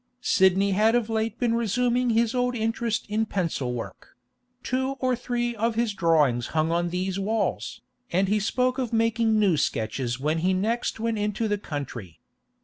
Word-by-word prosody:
Sidney 195 -1 +3
had 215 +4 +3
of 230 -2 0
late 220 0 -1
been 240 -2 +1
resuming 245 +2 +1
his 230 +1 +2
old 250 0 0
interest 225 0 -1
in 220 +1 0
pencil 165 -11 -2
work; 120 0 -8 0.5
two 260 +1 -1
or 255 -1 +1
three 240 0 -2
of 225 +1 0
his 230 -2 0
drawings 150 -10 +2
hung 155 +1 +2
on 175 +1 0
these 185 +2 -2
walls, 215 +2 -2 0.3
and 190 +3 +2
he 210 +2 +2
spoke 255 +5 0
of 250 -3 -2
making 225 -1 +2
new 195 -6 +3
sketches 120 0 -1
when 155 +4 0
he 185 +3 +1
next 225 +5 -1
went 225 -1 -1
into 210 +2 -1
the 205 -1 -1
country. 120 - -6
215 Hz, 170 wpm, -25 LUFS, 175-235 Hz, 0.5 s, Sidney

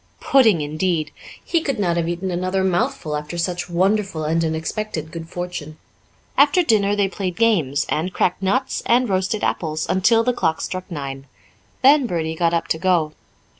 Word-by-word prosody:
Pudding, 225 - +4
indeed! 155 +1 -1 0.3
He 335 - +1
could 275 -4 -2
not 175 -5 0
have 170 -1 -1
eaten 175 +2 -3
another 185 +2 -1
mouthful 175 -4 -1
after 150 +3 -5
such 175 +1 -2
wonderful 190 -1 0
and 165 +2 +1
unexpected 160 +1 -3
good 165 -1 -8
fortune. 175 -4 -6 0.6
After 295 +6 +5
dinner 205 -7 +2
they 200 -1 +2
played 185 -2 -4
games, 170 -11 +2
and 165 +5 -1
cracked 180 0 0
nuts, 255 +8 0
and 245 +2 +3
roasted 190 +2 -1
apples, 155 -2 -1
until 225 +5 +3
the 250 +1 +1
clock 160 -8 0
struck 185 0 -5
nine; 135 -4 -6 0.6
then 275 -1 +6
Bertie 160 -4 -2
got 165 +1 +1
up 170 -1 -1
to 160 - 0
go. 170 -4 +1
180 Hz, 170 wpm, -21 LUFS, 160-205 Hz, 0.6 s, then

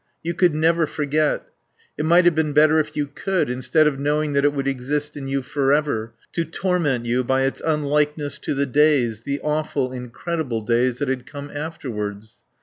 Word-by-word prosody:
You 170 +1 -2
could 175 -2 +3
never 165 +1 +2
forget. 150 +1 0 0.5
It 150 - -2
might 170 +2 +5
have 175 - +6
been 155 -1 0
better 155 +1 +5
if 150 0 -3
you 145 - +1
could, 170 +1 -1
instead 130 +5 +2
of 145 -3 +1
knowing 150 +1 0
that 140 0 +2
it 145 - +4
would 140 -1 -3
exist 145 +3 -2
in 140 -2 -6
you 135 0 -1
forever, 135 -5 0 0.2
to 170 - 0
torment 165 -7 -1
you 125 +2 +1
by 130 +2 +1
its 135 - -1
unlikeness 150 -1 0
to - - -3
the 140 +1 +1
days, 135 -5 +2
the 140 +4 -3
awful, 150 -3 -1
incredible 125 0 -3
days 120 +2 +1
that 145 - -2
had 130 -1 -2
come 145 0 -8
afterwards. 110 -9 -5
145 Hz, 185 wpm, -22 LUFS, 130-155 Hz, 0.5 s, have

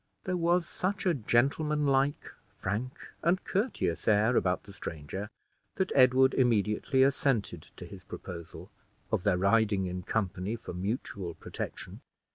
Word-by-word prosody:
There 185 - -1
was 175 0 +2
such 190 +1 -2
a 180 - +4
gentlemanlike, 140 +3 +1 0.3
frank, 110 +7 -3 0.2
and 175 +3 +2
courteous 200 - -1
air 110 +3 +4
about 90 -4 +1
the 100 - -13
stranger, 90 +4 -6 0.5
that 190 -1 -1
Edward 130 0 +5
immediately 120 +2 +2
assented 130 - 0
to - - -9
his - - -11
proposal, 85 -3 -9 0.4
of - - +1
their 100 -1 +2
riding 100 0 +3
in 90 0 -4
company 100 0 -2
for 115 - -8
mutual 95 -2 -4
protection. - - -7
115 Hz, 130 wpm, -30 LUFS, 95-140 Hz, 0.5 s, Edward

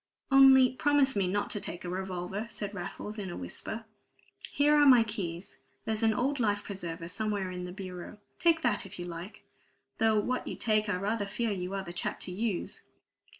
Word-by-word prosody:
"Only 265 -1 +8
promise 275 +1 +3
me 195 -2 +1
not 205 +3 -1
to 205 -1 -1
take 175 - -6
a - - -4
revolver," 190 +3 -4
said 205 -3 -5
Raffles 210 +3 -6
in 195 -2 -4
a - - -6
whisper. 215 - -6 0.7
"Here 295 +1 +4
are 295 -1 +6
my 250 -4 +8
keys; 195 -5 -5 0.3
there's 220 0 -1
an 220 -1 +3
old 275 +4 0
life 205 -3 +1
preserver 170 -4 -5
somewhere 200 0 -2
in 180 0 -5
the 180 - -6
bureau; 185 +1 -8 0.2
take 335 -2 +3
that, 235 -5 +2
if 195 - -10
you 175 - -5
like 175 +3 -8 0.6
though 220 -1 +4
what 250 +4 -2
you - - -4
take 215 -2 +1
I 205 - +1
rather 205 +2 -1
fear 230 +2 -1
you 185 0 -3
are 195 - -2
the 175 -2 -7
chap - - -3
to 185 - -4
use!" 200 0 -3
205 Hz, 195 wpm, -30 LUFS, 180-230 Hz, 0.7 s, Only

